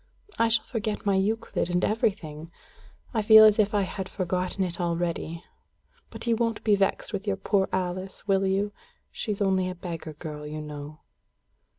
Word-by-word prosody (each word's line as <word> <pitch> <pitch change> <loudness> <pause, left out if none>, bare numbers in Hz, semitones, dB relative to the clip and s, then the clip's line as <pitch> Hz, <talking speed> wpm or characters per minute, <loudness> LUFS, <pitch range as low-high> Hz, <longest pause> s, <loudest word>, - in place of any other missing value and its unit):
I 230 - +5
shall 230 0 +2
forget 215 -3 -3
my 200 - +3
Euclid 195 -1 0
and 180 +1 +1
everything. 165 -8 -1 0.6
I 220 - +1
feel 220 +1 +9
as 215 0 +6
if 210 0 +3
I 205 - +3
had 190 0 -5
forgotten 185 +1 -1
it 180 -1 -3
all 175 - +1
already. 170 0 -3 0.7
But - - -8
you 235 -1 +3
won't 230 -1 -1
be 210 -2 +4
vexed 195 +2 0
with 200 +1 -4
your 195 -1 0
poor 195 0 +1
Alice, 185 +2 -3
will 195 -1 +3
you? 200 +2 0 0.4
She's 210 -2 -2
only 190 -1 +2
a 185 - -5
beggar 165 -3 -6
girl, 150 -1 -7
you 155 +1 -5
know." 150 0 -8
190 Hz, 180 wpm, -27 LUFS, 175-210 Hz, 0.7 s, feel